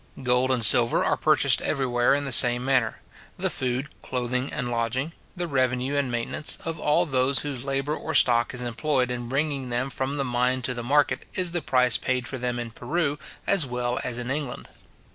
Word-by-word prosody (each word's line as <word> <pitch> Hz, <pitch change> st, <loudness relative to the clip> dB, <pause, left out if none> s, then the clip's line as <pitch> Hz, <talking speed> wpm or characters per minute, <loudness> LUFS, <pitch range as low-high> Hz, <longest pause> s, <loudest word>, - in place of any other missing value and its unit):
Gold 125 Hz, +1 st, +1 dB
and 125 Hz, -4 st, +3 dB
silver 115 Hz, +1 st, +6 dB
are -, -, +2 dB
purchased -, -, +3 dB
everywhere 125 Hz, -1 st, +1 dB
in 145 Hz, 0 st, -2 dB
the 135 Hz, -, -4 dB
same 120 Hz, +1 st, +6 dB
manner. 130 Hz, -4 st, 0 dB, 0.4 s
The -, -, -1 dB
food, 130 Hz, +2 st, -2 dB
clothing, 125 Hz, +1 st, -3 dB
and 125 Hz, -1 st, -4 dB
lodging, 120 Hz, +7 st, -2 dB, 0.2 s
the 175 Hz, -1 st, -3 dB
revenue 130 Hz, -1 st, 0 dB
and 140 Hz, -3 st, 0 dB
maintenance, 120 Hz, +5 st, -2 dB
of 165 Hz, -1 st, -4 dB
all 150 Hz, +5 st, +2 dB
those 135 Hz, -2 st, +1 dB
whose 135 Hz, -3 st, -5 dB
labour 140 Hz, +2 st, -2 dB
or -, -, -5 dB
stock 120 Hz, -1 st, +4 dB
is 125 Hz, -1 st, -2 dB
employed 125 Hz, +1 st, -1 dB
in 120 Hz, -1 st, -5 dB
bringing 135 Hz, -1 st, -2 dB
them 125 Hz, +3 st, -2 dB
from 135 Hz, +3 st, -3 dB
the 140 Hz, -, -1 dB
mine 125 Hz, +1 st, 0 dB
to 125 Hz, -, -2 dB
the 120 Hz, -, -5 dB
market, 145 Hz, +5 st, +1 dB
is 180 Hz, -2 st, 0 dB
the 175 Hz, 0 st, -1 dB
price 125 Hz, -3 st, +2 dB
paid 125 Hz, -1 st, -2 dB
for 130 Hz, -, -6 dB
them 125 Hz, 0 st, -2 dB
in 120 Hz, -1 st, -5 dB
Peru 145 Hz, +5 st, -2 dB, 0.3 s
as 185 Hz, -8 st, +3 dB
well 125 Hz, 0 st, -2 dB
as 120 Hz, -1 st, -3 dB
in 120 Hz, +1 st, -4 dB
England. 140 Hz, -3 st, -4 dB
130 Hz, 200 wpm, -25 LUFS, 120-140 Hz, 0.4 s, silver